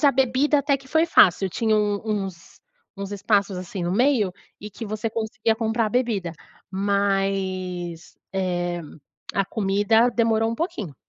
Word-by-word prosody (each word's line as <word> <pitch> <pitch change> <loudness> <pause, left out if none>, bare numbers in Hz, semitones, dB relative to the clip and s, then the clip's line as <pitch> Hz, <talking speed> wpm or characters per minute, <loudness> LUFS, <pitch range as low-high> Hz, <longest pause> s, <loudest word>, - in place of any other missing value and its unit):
Mas - - 0
a 280 - +7
bebida 270 +3 +2
até 280 0 +2
que 270 - -17
foi 320 +4 +3
fácil, 190 - +5
tinha 220 +3 +1
um 205 -1 +1
uns 195 -5 -4 0.4
uns 200 0 -5
espaços 200 -1 +1
assim 185 0 -5
no 175 +1 -1
meio, 235 -4 +2 0.3
e 210 +1 -8
que 225 +3 -7
você 215 +2 -2
conseguia 220 0 -1
comprar 225 0 0
a - - -1
bebida. 210 -8 -1 0.4
Mas, 190 -3 -1 0.2
eh, 175 -2 -1 0.5
a 195 0 +2
comida 210 +4 +2
demorou 225 -1 +1
pouquinho. 215 - -4
205 Hz, 150 wpm, -24 LUFS, 190-230 Hz, 0.5 s, a